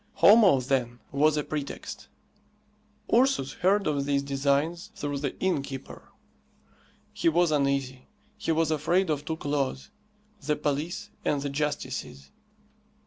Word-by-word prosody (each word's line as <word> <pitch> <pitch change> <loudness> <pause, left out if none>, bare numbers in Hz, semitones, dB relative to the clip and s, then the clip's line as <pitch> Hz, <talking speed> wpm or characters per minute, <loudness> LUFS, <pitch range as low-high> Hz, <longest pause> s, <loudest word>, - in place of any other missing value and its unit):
Homo, 205 - +7
then, 125 -2 -1
was 150 +2 +3
a 150 - 0
pretext. 145 -2 -6 1.1
Ursus 240 - +3
heard 195 +3 +3
of 145 -2 0
these 140 -1 +1
designs 140 +7 0
through 145 -1 -3
the 140 -2 -3
inn 185 -6 +1
keeper. 135 -1 -9 1.0
He - - +2
was 170 0 +2
uneasy. 140 -3 0 0.3
He - - -2
was 160 -1 +1
afraid 165 +4 +1
of 145 -1 -2
two 160 0 -3
claws 140 - -2 0.5
the 150 +2 +1
police 150 +7 -3
and 145 - +1
the 140 - -3
justices. 140 - -4
145 Hz, 130 wpm, -27 LUFS, 140-165 Hz, 1.1 s, Homo